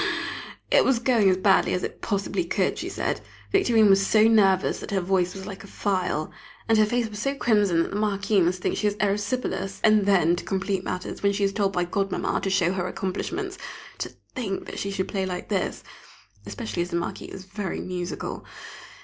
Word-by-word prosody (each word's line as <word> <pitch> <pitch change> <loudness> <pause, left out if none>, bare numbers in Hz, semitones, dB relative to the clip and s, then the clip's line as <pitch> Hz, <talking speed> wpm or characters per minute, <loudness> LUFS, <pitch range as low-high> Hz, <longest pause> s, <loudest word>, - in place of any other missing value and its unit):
It - - +6
was 265 -2 +3
going 230 -4 +3
as 185 - +3
badly 190 0 +3
as 180 - -2
it - - -5
possibly 200 - -1
could, - - 0
she - - -4
said. - - -2 0.3
Victorine 235 - +4
was 195 0 +5
so 215 +2 +4
nervous 195 -4 +3
that - - -8
her 200 - +1
voice 180 0 0
was 190 0 -7
like 195 -1 -8
a - - -11
file, 185 -7 -1 0.4
and 225 -1 +4
her 215 - +5
face 240 +1 0
so 275 +4 -1
crimson 205 -10 +3
that - - -6
the 200 - -2
Marquis 200 -1 +1
must 180 +1 0
think - - 0
she 210 - +1
has 205 - 0
erysipelas! 205 -1 -1
And 215 -2 +4
then, 175 -4 +4
to - - -5
complete 195 0 -1
matters, 180 - -5
when 200 0 +2
she 200 0 -1
is 195 0 +1
told 200 -1 0
by 180 -1 +1
Godmamma 195 +2 -1
to 195 - -1
show 185 -1 +2
her 185 -1 -2
accomplishments, 360 - -4 0.4
to - - -3 0.2
think 205 -7 -3
that - - -7
she 200 - -2
should 195 -1 -2
play 190 -2 -2
like 180 -1 -5
this! 195 -4 -1 0.6
Especially 105 +8 -4
as 175 - -2
the 170 - -3
Marquis 170 - -4
is 190 - -9
very 195 -1 -4
musical! 180 -1 -4
195 Hz, 205 wpm, -25 LUFS, 185-210 Hz, 0.6 s, It